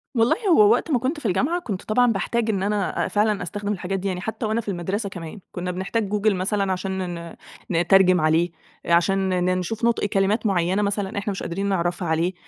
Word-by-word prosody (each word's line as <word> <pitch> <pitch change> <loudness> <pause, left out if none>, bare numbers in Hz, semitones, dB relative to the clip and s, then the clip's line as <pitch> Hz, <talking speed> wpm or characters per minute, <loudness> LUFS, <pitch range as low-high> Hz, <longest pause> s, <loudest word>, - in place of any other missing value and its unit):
والله 230 +1 +4
هو 410 +4 +6
وقت 340 - +1
ما 255 - +3
كنت 270 +6 -2
في 295 - -13
الجامعة 270 - +1
كنت 205 - -5
طبعًا 245 +2 +3
باحتاج 225 +3 -1
إن 195 -3 0
أنا 205 -1 0
أ - - -2
فعلًا 210 -2 +1
أستخدم 205 +3 -3
الحاجات 195 +1 -3
دي، 195 - -3
يعني 180 -2 -3
حتى 220 +3 -4
وأنا 220 +2 0
في 215 - -20
المدرسة 195 +3 -2
كمان 175 +2 -8
كنّا 180 0 -4
بنحتاج 195 +3 -2
google 210 +1 +2
مثلًا 195 +1 0
عشان 185 -1 -3
ن 170 0 -8 0.3
ن 165 -2 +1
نترجم 185 0 +5
عليه، 160 +2 +2 0.3
آآ، 170 - +1
عشان 190 +2 +2
ن 185 0 +1
نشوف 220 +6 -2
نُطق 235 -2 +2
كلمات 205 +2 +1
معيّنة 185 0 +1
مثلًا 200 -1 -2
إحنا 200 0 -2
مش 195 - -5
قادرين 195 +4 -3
نعرفها 175 -1 -1
عليه، 165 +3 +1
195 Hz, 215 wpm, -23 LUFS, 180-215 Hz, 0.3 s, هو